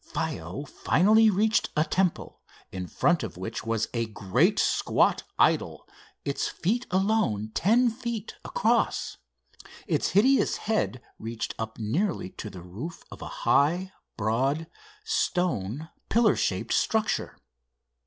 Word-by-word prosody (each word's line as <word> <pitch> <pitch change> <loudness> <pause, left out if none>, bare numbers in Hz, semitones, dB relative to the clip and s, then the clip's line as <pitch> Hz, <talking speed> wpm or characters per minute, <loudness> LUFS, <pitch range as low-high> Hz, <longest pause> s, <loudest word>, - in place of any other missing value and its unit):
Faiow 155 -3 -4
finally 215 +10 +4
reached 215 +2 +2
a 155 - +5
temple, 180 +1 -1 0.3
in 90 -1 -5
front 175 - +2
of 110 -7 -6
which 100 +5 -5
was 115 -1 -1
a 115 -1 -1
great 100 -3 +1
squat - - +2 0.2
idol, - - +1 0.4
its 140 - -1
feet 235 +8 -1
alone 185 - +1
ten 235 +6 +3
feet 235 -2 -4
across. 230 +1 0 0.7
Its - - +1
hideous 255 +8 +3
head 125 - -1 0.2
reached 115 +1 -4
up 110 0 -5
nearly 180 - -1
to 115 - -7
the 90 -3 -10
roof 120 - -8
of - - -10
a - - -5 0.2
high, 175 +6 +3 0.3
broad, 130 +9 0 0.4
stone 160 - -1 0.2
pillar 230 0 +4
shaped - - -1
structure. 220 -1 0
165 Hz, 125 wpm, -27 LUFS, -, 0.7 s, a